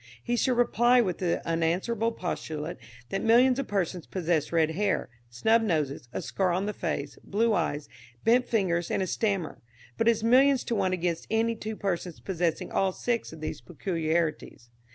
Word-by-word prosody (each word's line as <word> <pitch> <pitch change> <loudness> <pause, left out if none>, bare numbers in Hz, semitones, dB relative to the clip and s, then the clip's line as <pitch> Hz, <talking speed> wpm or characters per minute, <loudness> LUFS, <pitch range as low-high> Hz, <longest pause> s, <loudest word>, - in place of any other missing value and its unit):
He 240 - 0
should 250 0 +1
reply 245 +1 +4
with 185 -8 0
the 175 -2 -1
unanswerable 175 +8 0
postulate 160 -5 -4 0.3
that 195 - -2
millions 250 +3 +5
of 275 - -2
persons 185 -4 -2
possess 170 -4 -1
red 160 -2 +2
hair, 195 -4 0 0.2
snub 220 - +3
noses, 150 - -1
a - - -4
scar 190 -2 0
on 185 +3 0
the 210 - -2
face, 150 -7 -4
blue 225 +3 +1
eyes, 150 -5 -1 0.4
bent 245 +2 +4
fingers 175 -6 0
and 190 - 0
a - - -1
stammer; 195 -3 -1 0.4
but 225 - +2
it - - +8
is 220 -1 -3
millions 265 +3 +5
to 235 - -2
one 190 -3 +1
against 175 -2 -2
any 225 +1 +1
two 220 0 -5
persons 180 -4 -3
possessing 175 -4 -2
all 195 -1 +2
six 235 +4 -2
of 160 -1 -11
those 155 - -4
peculiarities. 160 -7 -2
190 Hz, 175 wpm, -28 LUFS, 165-225 Hz, 0.4 s, it